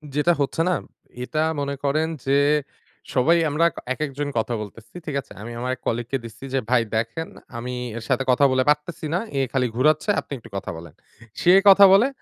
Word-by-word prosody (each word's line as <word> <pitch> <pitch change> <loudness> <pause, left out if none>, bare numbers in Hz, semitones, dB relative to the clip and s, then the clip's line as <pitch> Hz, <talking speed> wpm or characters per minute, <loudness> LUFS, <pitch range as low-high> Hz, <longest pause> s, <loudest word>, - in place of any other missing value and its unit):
যেটা 150 +4 +3
হচ্ছে 140 +3 0
না, 180 - +2 0.5
এটা 155 +4 -1 0.2
মনে 140 0 -2
করেন 155 +3 +1 0.2
যে 135 +1 +3 0.8
সবাই 155 +7 +4
আমরা 150 +3 +2
কা - - -7
একেকজন 145 0 -3
কথা 115 +2 0
বলতেছি। 105 +2 -11
ঠিক 150 - -4
আছে? - - -28
আমি 115 +2 -7
আমার 125 +1 -2
এক - - -30
colleague 120 0 -2
কে 135 - +1
দিচ্ছি 115 +3 -10
যে, 135 - +2
"ভাই 125 -1 +4
দেখেন, 115 +9 -2 0.3
আমি 125 +2 -5 0.2
এর 115 - -6
সাথে 135 -1 +1
কথা 135 +3 +4
বলে 130 0 +2
পারতেছি 150 +2 0
না। 175 - +2 0.2
এ - - +2
খালি 130 -2 +1
ঘুরাচ্ছে, 155 - +2
আপনি - - -10
একটু - - -14
কথা - - -5
বলেন।" 80 -2 -11 0.5
সে 180 - +6 0.2
কথা 200 +1 +9
বলে, 205 +6 +6
140 Hz, 200 wpm, -23 LUFS, 120-155 Hz, 0.8 s, কথা